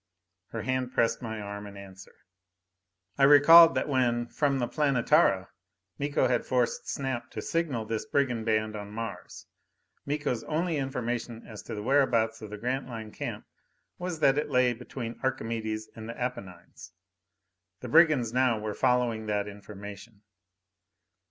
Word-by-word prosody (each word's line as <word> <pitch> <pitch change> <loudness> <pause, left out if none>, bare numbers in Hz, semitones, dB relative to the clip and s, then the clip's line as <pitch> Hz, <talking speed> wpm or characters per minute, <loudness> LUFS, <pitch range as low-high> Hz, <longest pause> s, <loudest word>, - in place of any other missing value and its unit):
Her - - -6
hand 130 -1 -2
pressed 115 0 +1
my 110 -2 -5
arm 100 0 -7
in 100 0 -11
answer. 95 -1 -12 1.0
I - - +4
recalled 165 +4 +8
that - - 0
when, 125 -4 +1
from 140 -2 0
the 120 -2 -1
Planetara, 140 - +2 0.5
Miko 145 0 +1
had 120 -2 +1
forced 125 -2 -1
Snap 135 -3 -3
to - - -7
signal 150 -10 -2
this 110 0 -3
brigand 125 -5 0
band 110 -1 0
on 105 -1 -7
Mars, 115 +2 -7 0.6
Miko's 145 -5 -2
only 165 +1 -1
information 120 -3 -3
as 110 -2 -9
to 115 - -7
the 105 - -5
whereabouts 120 -4 +2
of 110 - -8
the 105 - -7
Grantline 120 -2 -4
camp - - -6 0.5
was 175 -3 -4
that 135 +2 +4
it 150 - -3
lay 125 -2 +3
between 120 0 -7
Archimedes 110 -4 -3
and 110 0 -8
the 115 - -7
Apennines. 95 -8 -7 0.9
The 125 - -6
brigands 145 -5 +4
now 125 -2 +2
were 105 0 -4
following 125 -3 +1
that 105 -1 -1
information. 100 +1 -10
120 Hz, 145 wpm, -28 LUFS, 110-135 Hz, 1.0 s, recalled